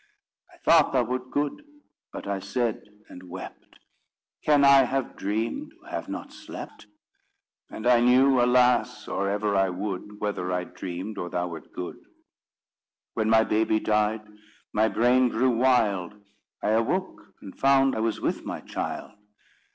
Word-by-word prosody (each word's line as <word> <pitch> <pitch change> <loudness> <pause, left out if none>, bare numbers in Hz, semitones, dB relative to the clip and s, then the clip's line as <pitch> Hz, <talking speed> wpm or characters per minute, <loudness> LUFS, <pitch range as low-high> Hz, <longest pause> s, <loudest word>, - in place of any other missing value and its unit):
I - - -19
thought - - +4
thou 130 -2 +3
wert 125 +2 -4
good; 145 - -2 0.5
but - - -8
I 100 -1 -1
said, 120 +2 -2 0.3
and 90 0 -12
wept: 95 +1 -10 0.7
'Can 145 -2 +4
I 140 -1 +7
have 135 +1 -2
dreamed 110 +3 -3
who - - -23
have - - -5
not - - -6
slept?' - - -10 0.8
And 110 - -8
I 120 -1 +5
knew, 125 +2 +5
alas! 125 0 +2
or 100 0 -1
ever 105 0 0
I 95 -1 +3
would, 100 +2 -5
Whether 100 -3 -2
I 90 0 -1
dreamed, 90 +3 -6
or 90 - -4
thou 90 +1 -2
wert 80 -2 -10
good. 90 - -6 1.2
When 110 -1 0
my 110 0 +5
baby 110 0 +1
died, 105 0 0 0.5
my 110 +1 +3
brain 125 +4 +3
grew 125 +1 +1
wild. 110 -7 +2 0.5
I - - +1
awoke, 125 - -1
and 95 - -11
found 135 -1 +3
I - - -2
was 110 -1 -1
with - - -2
my - - -5
child." - - -5
110 Hz, 150 wpm, -26 LUFS, 100-125 Hz, 1.2 s, I